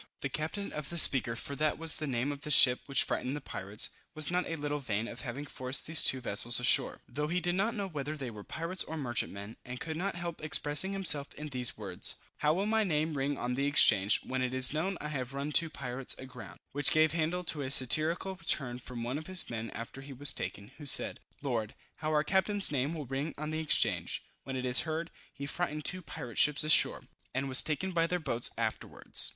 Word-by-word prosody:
The 140 - -2
captain 160 +9 -4
of 150 -2 -5
the 170 - -3
Speaker, 130 -6 +6
for 140 +5 -4
that 155 0 0
was 165 -1 +5
the 155 - -3
name 130 +2 -1
of 140 -1 -7
the 150 - -6
ship 125 -3 +7
which 140 -2 +3
frightened 130 +3 -3
the - - -4
pirates, 100 -6 -3 0.2
was 155 +1 +2
not 180 +1 0
a 165 - -2
little 145 -1 -3
vain 115 -4 -3
of 120 - -7
having 130 +4 -6
forced 130 -1 0
these 160 0 +5
two 130 - +3
vessels 120 +1 +2
ashore, 125 - +4
though 150 +1 -3
he 175 +3 0
did 175 0 -1
not 200 +5 0
know 200 -2 -3
whether 150 -3 -5
they 130 -4 -6
were 105 -2 -10
pirates 165 - -1
or 160 - -6
merchantmen, 115 -6 -3
and 125 0 -8
could 160 -1 -5
not 190 +4 -3
help 170 -2 -6
expressing 150 +4 0
himself 150 -7 -3
in 150 0 -7
these 125 -3 -2
words: 95 -4 0 0.2
"How 150 - +2
will 190 +5 0
my 220 +1 +2
name 155 -4 -1
ring 140 +1 -2
on 125 +1 -3
the 140 +3 -1
exchange, 105 -8 +6
when 130 0 -3
it 130 0 -2
is 130 +1 +4
known 175 +5 -2
I 150 - -5
have 135 -2 -5
run 140 +2 -3
two 165 +2 +5
pirates 130 -3 -3
aground;" 125 -2 -11
which 145 0 +4
gave 155 -1 +3
handle 170 +3 -1
to 160 -3 -1
a 130 - -4
satirical 155 +8 +3
return 135 -8 -1
from 120 -1 -7
one 125 +5 -3
of 155 - -10
his 185 -1 +1
men 115 -1 -5
after 115 +3 -8
he 140 0 -10
was 140 +2 -1
taken, 100 +3 -6
who 150 - -9
said, - - +3 0.2
"Lord! 115 -6 -3 0.2
how 155 - -3
our 150 -1 +2
captain's 195 +3 +3
name 140 +3 -1
will 150 -3 -6
ring 135 +5 -4
on 155 +1 -5
the 155 - -3
exchange, 155 -2 +1 0.2
when 135 - -5
it 130 0 -3
is 125 0 +6
heard, 160 +1 -3 0.2
he 140 - -8
frightened 150 -1 -3
two 185 - 0
pirate 120 -8 -6
ships 150 +1 +5
ashore, 155 +1 +5 0.3
and 135 +1 -1
was 130 -1 +5
taken 170 +5 -2
by 165 -2 +1
their 180 - -1
two 170 - -11
boats 120 -3 +2
afterwards." - - -1
145 Hz, 230 wpm, -31 LUFS, 125-160 Hz, 0.3 s, ship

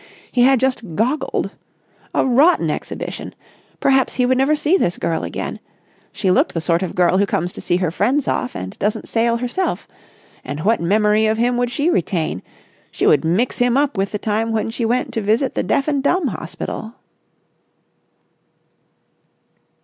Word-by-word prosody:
He 245 - +2
had 265 +1 +5
just 235 -9 -1
goggled. 255 - -1 0.6
A - - +3
rotten 275 +8 +4
exhibition! - - -6 0.4
Perhaps 265 -1 +2
he 250 - +2
would 255 +1 +2
never 280 +3 +3
see 305 +4 +2
this 175 - +1
girl 165 - -1
again. - - -5 0.5
She 190 - 0
looked - - +2
the - - +1
sort 170 +1 +1
of 185 - -4
girl 180 +1 +3
who 200 - +2
comes 175 0 -1
to - - -9
see 175 - +1
friends 215 - 0
off 250 - -1
and 95 0 -6
doesn't 210 +1 -1
sail 235 0 +1
herself. 250 +10 -2 0.6
And 145 +1 -5
what 220 +4 +2
memory 210 +4 +3
of 220 0 +1
him 245 +2 +1
would 245 0 0
she 285 +8 0
retain? 165 - -1 0.5
She - - -2
would 145 - +4
mix 185 +10 0
him 245 +1 +3
up 285 -2 +1
with 195 0 -1
the 210 - -2
time 220 +2 -1
when 225 0 -1
she 230 0 -2
went 250 +2 0
to 225 - -1
visit 225 +6 +1
the - - 0
deaf 275 - 0
and 285 -2 +1
dumb 315 +1 +1
hospital. 220 +5 -6
230 Hz, 170 wpm, -19 LUFS, 190-260 Hz, 0.6 s, had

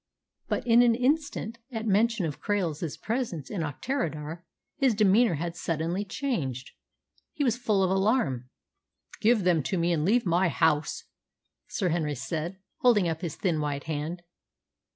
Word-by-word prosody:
But - - -2
in 235 0 +6
an 235 -1 +5
instant, 255 -3 0
at 225 -2 -4
mention 220 -1 +2
of 150 -3 -5
Krail's 170 -7 -1
presence 220 - -3
in 195 - -2
Auchterarder, 160 - -3 0.4
his 265 -6 +3
demeanour 215 0 +4
had 170 +3 -4
suddenly 170 +3 -2
changed. 155 - -3 0.6
He 295 - -1
was 240 -4 +2
full 215 -5 +1
of 185 - +2
alarm. 190 - +1 0.7
"Give 220 -2 +3
them 175 -3 +3
to 185 +7 -2
me 170 +1 +1
and 155 -3 0
leave 230 +7 +3
my 175 +1 +3
house," 160 -2 +1 0.6
Sir 185 -4 -1
Henry 155 -3 0
said, 155 +7 -4 0.2
holding 220 -7 +4
up 160 0 -2
his 170 -5 -4
thin 170 -5 0
white 145 -2 -2
hand. 160 +3 -4
180 Hz, 150 wpm, -28 LUFS, 155-230 Hz, 0.7 s, in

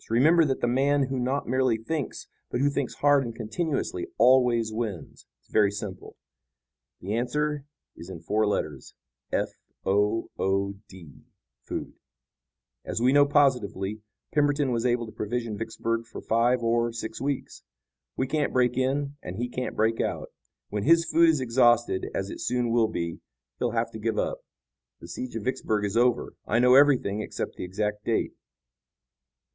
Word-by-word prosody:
Remember 155 +9 +5
that 135 -2 -1
the - - +2
man 140 +3 +2
who 135 -1 -2
not 130 +3 -1
merely 130 -2 +2
thinks, 140 +5 -4 0.2
but 120 - -2
who 140 +2 +2
thinks 140 -2 -2
hard 145 -1 +4
and 115 -2 -6
continuously 160 - -2
always 120 -4 +4
wins. 110 -6 -5 0.2
It's - - -31
very 105 -2 +4
simple. 100 -2 -7 0.9
The 100 +3 -3
answer 150 +5 -1 0.3
is 85 - -10
in 90 -4 -8
four 105 +5 +1
letters, 75 -9 -3 0.4
f - - 0 0.4
o 105 +3 +1
o 100 +1 0 0.2
d, 85 -7 -14 0.5
food. - - -5 0.9
As - - -3
we 125 +3 +3
know 145 0 +6
positively, 110 -8 +1 0.3
Pemberton 145 -2 +2
was 120 +1 +1
able 120 -1 +1
to 110 - -10
provision 110 +1 -3
Vicksburg 115 +1 -3
for - - -8
five 120 +2 +2
or 115 0 +1
six 110 -1 -6
weeks. 140 -1 -3 0.6
We 130 - +1
can't 145 +2 0
break 125 -1 +2
in 140 +2 0
and 90 - -7
he 120 +4 -2
can't 125 +1 -4
break 110 +1 +1
out. - - -3 0.4
When 105 0 -2
his 165 +7 +4
food 165 +1 +4
is 155 -4 +2
exhausted, 120 -5 +3
as 95 +1 -2
it - - -7
soon 125 -1 0
will 115 -1 +3
be, 85 -5 -4 0.4
he'll 120 -2 0
have 115 - 0
to 110 - -8
give 110 0 -1
up. - - -1 0.6
The - - -11
siege 125 -2 -6
of 115 - -4
Vicksburg 110 -4 -1
is 100 - -3
over. 120 +1 +2
I 110 - +2
know 125 +1 +5
everything, 130 -7 +4
except - - -5
the - - -6
exact 105 +3 -3
date." 115 +1 0
120 Hz, 165 wpm, -27 LUFS, 110-135 Hz, 0.9 s, know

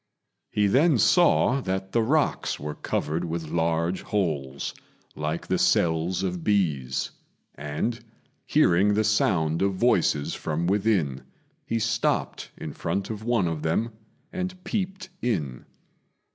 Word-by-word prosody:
He 105 - +1
then 140 - +4
saw 140 -4 +4
that 95 -2 -3
the 115 - +2
rocks 145 +7 +1
were 75 +1 -4
covered 80 +3 -2
with 80 -2 -4
large 85 +2 0
holes, 75 -9 -2 0.4
like 75 +2 -3
the - - 0
cells 85 +3 +2
of 90 -3 -2
bees; 75 -11 0 0.4
and, 80 - -3 0.4
hearing 100 +4 +4
the 110 - +2
sound 85 -7 +2
of 100 0 +1
voices 90 -9 +2
from 80 +2 -2
within, 95 -8 +1 0.5
he 115 - 0
stopped 115 0 -1
in 75 - -6
front 100 +2 -2
of 110 -1 -6
one 115 -7 +2
of 80 -2 -3
them 110 +9 0 0.4
and 185 0 -4
peeped 190 -2 -3
in. 75 - -2
95 Hz, 130 wpm, -26 LUFS, 80-115 Hz, 0.5 s, then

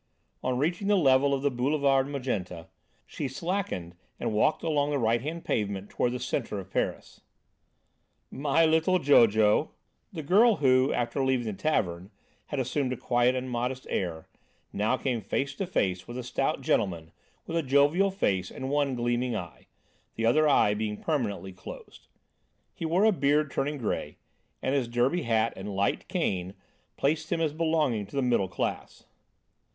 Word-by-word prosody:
On 125 -1 -1
reaching 170 +8 -1
the 205 - +4
level 140 -3 +4
of 135 0 -1
the 145 - +2
Boulevard 135 +1 +2
Magenta, 95 - -4 0.4
she 145 - -4
slackened 130 - -3 0.2
and - - -2
walked 110 +8 +2
along 150 -3 +1
the 145 - 0
right 115 -2 +1
hand 160 +5 -5
pavement 100 -2 -2
toward 120 - 0
the 125 - -3
centre 115 -6 -3
of 95 -1 -8
Paris. - - -3 1.1
"My 145 +4 +2
little 160 +3 +3
Jojo!" 110 - +4 0.4
The 160 - -6
girl 210 +9 +5
who, 130 -2 +3
after 120 +3 -1
leaving 130 -2 +1
the 110 - -3
tavern, 95 - -1 0.4
had 145 - -3
assumed 130 +1 -1
a - - -5
quiet 120 +2 +2
and 130 0 -3
modest 125 +1 -3
air, 85 -4 -3 0.5
now 110 +5 +1
came 125 -4 -2
face 135 +7 -2
to 195 - -2
face 90 - -1
with 120 - -7
a 125 - -4
stout 135 +4 -1
gentleman 85 -10 -1 0.3
with 165 - -5
a 165 - +2
jovial 145 +7 +3
face 95 - -1
and 130 +1 -5
one 145 -2 +1
gleaming 120 0 -1
eye, 90 -5 -7 0.5
the 115 - -1
other 150 +6 +4
eye 105 -7 +4
being 105 0 -3
permanently 105 - -2
closed. 95 - -11 0.7
He 165 - -4
wore 180 +6 +3
a 220 - +6
beard 145 -3 +1
turning 145 +2 -1
grey 115 -6 -3 0.5
and 130 - 0
his 135 -4 +1
derby 120 +9 +1
hat 115 -2 +1
and 100 +1 -6
light 100 +1 0
cane 95 0 -2 0.4
placed 155 +3 0
him 170 - +1
as 160 -3 0
belonging 155 -10 0
to 105 - -12
the 140 - +1
middle 120 -6 +2
class. - - -4
130 Hz, 165 wpm, -28 LUFS, 110-150 Hz, 1.1 s, a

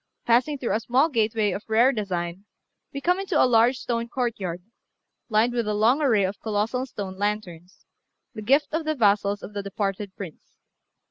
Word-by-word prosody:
Passing 250 +5 +2
through 255 - -2
a 215 - +1
small 255 +7 +2
gateway 220 -5 +1
of 200 - -4
rare 235 +4 +5
design, 185 -4 -4 0.5
we 280 - -6
come 360 +4 +2
into 390 - 0
a - - +6
large 245 +1 +4
stone 235 -2 -2
courtyard, 200 -9 -3 0.7
lined 225 +2 +2
with 235 -3 -1
a 210 - 0
long 235 +8 +3
array 230 -9 +3
of 190 +2 -3
colossal 225 +4 -1
stone 195 -5 -7
lanterns, 195 -4 -4 0.5
the 215 - -7
gift 275 +8 +2
of 320 +1 0
the 310 0 -1
vassals 205 -3 +2
of 210 - -8
the 205 - -3
departed 200 0 -4
Prince. 180 -6 -10
215 Hz, 180 wpm, -25 LUFS, 200-250 Hz, 0.7 s, a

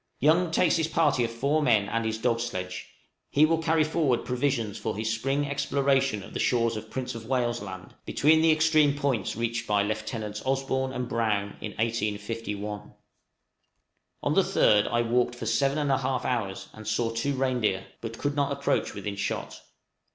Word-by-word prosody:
Young 165 +5 +4
takes 165 +1 +3
his 160 -1 +1
party 150 -6 +2
of 115 - 0
four 140 +7 0
men 110 -8 +3
and 115 +2 -1
his 110 0 -1
dog 115 0 +1
sledge; 90 -6 -4 0.4
he 150 +2 +5
will 165 +1 +2
carry 160 -1 +3
forward 150 -5 +1
provisions 125 -4 -1
for - - -3
his 110 +1 -1
spring 135 +5 -1
exploration 140 -5 +1
of - - -12
the - - -3
shores 115 -2 +2
of 110 0 -7
Prince 130 +1 -4
of 115 -1 -8
Wales' 120 -3 0
Land, 95 -2 -8
between 160 +2 +3
the 160 0 +5
extreme 155 -2 +4
points 135 -8 -1
reached 115 +1 -2
by 105 -1 +2
Lieutenants 110 0 -4
Osborn 130 0 0
and 125 -1 -3
Brown 110 -4 0
in 105 - -5
1851. 105 -1 -3 1.3
On - - +1
the - - +5
3d 105 -1 +3
I 120 0 +1
walked 120 +1 +1
for 120 - -6
seven 135 +5 +1
and 145 -2 0
a 135 - +2
half 130 -1 -1
hours, 95 -6 -2
and 110 0 -11
saw 115 +1 0
two 115 +5 -1
reindeer, 125 -8 0 0.2
but 115 0 -6
could 145 0 -2
not 140 -1 +1
approach 140 -4 -1
within 100 0 -4
shot. 100 - -4
120 Hz, 180 wpm, -27 LUFS, 110-140 Hz, 1.3 s, he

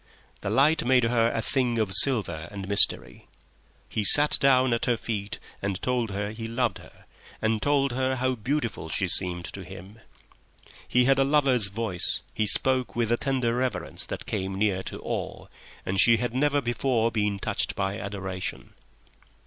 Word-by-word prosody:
The - - -5
light 150 +4 +3
made 125 0 +3
her 115 0 +1
a 115 - -3
thing 125 -3 -1
of 105 -4 -1
silver 95 - +2
and 100 -2 -8
mystery. 100 0 +1 0.6
He 110 - -3
sat 145 +9 +8
down 130 -2 +3
at 115 - -1
her 120 -1 0
feet 105 -3 -5 0.2
and 100 -2 -3
told 125 -3 -2
her 100 +1 -4
he 115 +1 -7
loved 115 +1 -2
her, - - -18 0.3
and 110 -1 -1
told 140 0 +1
her 130 +1 -1
how 130 0 -1
beautiful 120 - -3
she 95 +5 -1
seemed 90 -1 +1
to 95 - -8
him. 95 +4 -12 0.9
He 125 0 +2
had 135 +1 +3
a - - +4
lover's 135 -6 +2
voice, 100 -3 -1
he 105 0 -1
spoke 130 +3 +2
with 115 -1 -1
a 120 - +2
tender 130 -4 -1
reverence 125 -6 -3
that - - -7
came 95 0 -4
near 100 -2 0
to - - -8
awe, - - -5 0.4
and 95 +1 -2
she 115 -1 +5
had 125 0 -3
never 145 +2 +1
before 120 -1 -1
been 105 -3 -1
touched - - -3
by 100 +1 -3
adoration. 95 -2 -6
115 Hz, 175 wpm, -25 LUFS, 100-130 Hz, 0.9 s, sat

